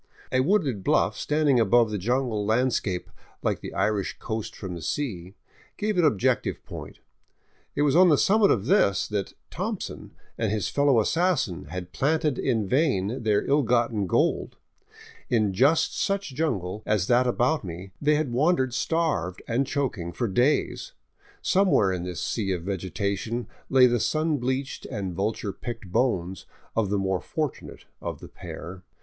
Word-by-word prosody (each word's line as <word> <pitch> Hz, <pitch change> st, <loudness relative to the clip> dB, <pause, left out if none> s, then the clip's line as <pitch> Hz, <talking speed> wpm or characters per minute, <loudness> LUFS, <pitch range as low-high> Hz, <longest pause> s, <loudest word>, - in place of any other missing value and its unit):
A 130 Hz, -, +2 dB
wooded 135 Hz, -, +1 dB
bluff -, -, +2 dB
standing 150 Hz, -4 st, +2 dB
above 115 Hz, +1 st, +4 dB
the 105 Hz, -, -2 dB
jungle 120 Hz, 0 st, 0 dB
landscape, 110 Hz, -4 st, 0 dB, 0.3 s
like -, -, 0 dB
the -, -, -7 dB
Irish 105 Hz, -3 st, 0 dB
coast 110 Hz, -1 st, -5 dB
from 95 Hz, -3 st, -6 dB
the 85 Hz, -, -7 dB
sea, 95 Hz, -, -3 dB, 0.4 s
gave 210 Hz, 0 st, -1 dB
an 175 Hz, -, +3 dB
objective 110 Hz, -11 st, +1 dB
point. -, -, -9 dB, 0.8 s
It 145 Hz, -, +2 dB
was 145 Hz, -1 st, +3 dB
on 180 Hz, +1 st, +7 dB
the 150 Hz, -, +5 dB
summit 210 Hz, +5 st, +4 dB
of 100 Hz, -2 st, +2 dB
this 125 Hz, -, +3 dB
that 100 Hz, -3 st, -3 dB
" -, -, -46 dB
Thompson -, -, -5 dB
" -, -, -35 dB
and 110 Hz, -3 st, 0 dB
his 105 Hz, -4 st, -1 dB
fellow 140 Hz, -4 st, +3 dB
assassin 160 Hz, -, 0 dB
had 90 Hz, +3 st, -7 dB
planted 150 Hz, 0 st, +1 dB
in 115 Hz, -6 st, 0 dB
vain 130 Hz, -, +1 dB
their 105 Hz, -2 st, +1 dB
ill 145 Hz, +2 st, +3 dB
gotten 115 Hz, -5 st, +1 dB
gold; -, -, 0 dB, 0.7 s
in 110 Hz, -5 st, +2 dB
just 140 Hz, -, +3 dB
such 195 Hz, -7 st, -1 dB
jungle 110 Hz, -, -2 dB
as 105 Hz, -5 st, +1 dB
that 125 Hz, +4 st, +3 dB
about 125 Hz, +5 st, +1 dB
me 90 Hz, +1 st, -7 dB
they 150 Hz, +1 st, +3 dB
had 150 Hz, -5 st, -1 dB
wandered 130 Hz, -2 st, +2 dB
starved 130 Hz, -, -1 dB
and 125 Hz, +4 st, 0 dB
choking 110 Hz, -12 st, -2 dB
for 120 Hz, +7 st, -2 dB
days; 130 Hz, -, +1 dB, 0.5 s
somewhere 185 Hz, -, +3 dB
in 90 Hz, -1 st, -2 dB
this 90 Hz, -4 st, -5 dB
sea 100 Hz, +2 st, -1 dB
of 85 Hz, -2 st, -4 dB
vegetation 100 Hz, +5 st, -2 dB, 0.2 s
lay 130 Hz, -1 st, +6 dB
the 120 Hz, -1 st, +3 dB
sun 155 Hz, +5 st, +1 dB
bleached 130 Hz, +2 st, -3 dB
and 100 Hz, -7 st, -4 dB
vulture 100 Hz, +1 st, -2 dB
picked 115 Hz, -4 st, -7 dB
bones 95 Hz, -7 st, 0 dB, 0.3 s
of 110 Hz, -4 st, +1 dB
the 100 Hz, -, +1 dB
more 95 Hz, -2 st, 0 dB
fortunate 155 Hz, -4 st, -5 dB, 0.2 s
of -, -, -5 dB
the -, -, -10 dB
pair. 90 Hz, +2 st, -9 dB
120 Hz, 165 wpm, -26 LUFS, 95-145 Hz, 0.8 s, on